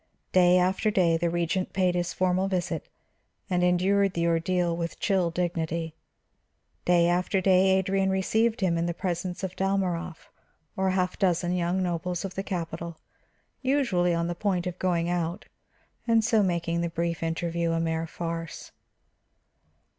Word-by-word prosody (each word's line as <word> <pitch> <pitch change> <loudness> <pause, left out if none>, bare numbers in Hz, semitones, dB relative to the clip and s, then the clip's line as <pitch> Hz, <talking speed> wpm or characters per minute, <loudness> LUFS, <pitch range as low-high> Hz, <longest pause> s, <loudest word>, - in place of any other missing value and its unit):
Day 180 -1 +5
after 185 +4 +2
day 180 -5 +3
the 170 +1 0
Regent 175 +2 -1
paid 185 -2 +2
his 175 -1 -1
formal 185 +1 +1
visit 185 -2 -2 0.6
and 180 -1 +2
endured 190 +2 +2
the 170 0 0
ordeal 170 +1 +1
with 170 0 -4
chill 190 -4 +1
dignity. 165 -2 -2 0.9
Day 175 -1 +4
after 180 +3 +1
day 190 0 +4
Adrian 190 0 +1
received 220 +4 +1
him 170 -3 +1
in 170 - 0
the 170 - -2
presence 180 0 -3
of 185 -1 -4
Dalmorov 180 -3 -2 0.4
or 190 0 +1
half 185 -1 0
a - - -15
dozen 175 -2 +1
young 180 +1 0
nobles 175 +1 -2
of 190 - -5
the 195 - -3
capital; 170 -3 -5 0.6
usually 255 -11 +2
on 170 0 0
the 175 - -2
point 185 -1 -1
of 180 0 -5
going 170 -2 +1
out, 175 0 -2 0.6
and 230 -1 +4
so 220 -1 +3
making 170 -3 0
the 170 - -1
brief 170 0 -2
interview 165 +1 -1
a 165 - 0
mere 165 0 -1
farce. 165 0 -6
180 Hz, 155 wpm, -27 LUFS, 170-190 Hz, 0.9 s, Day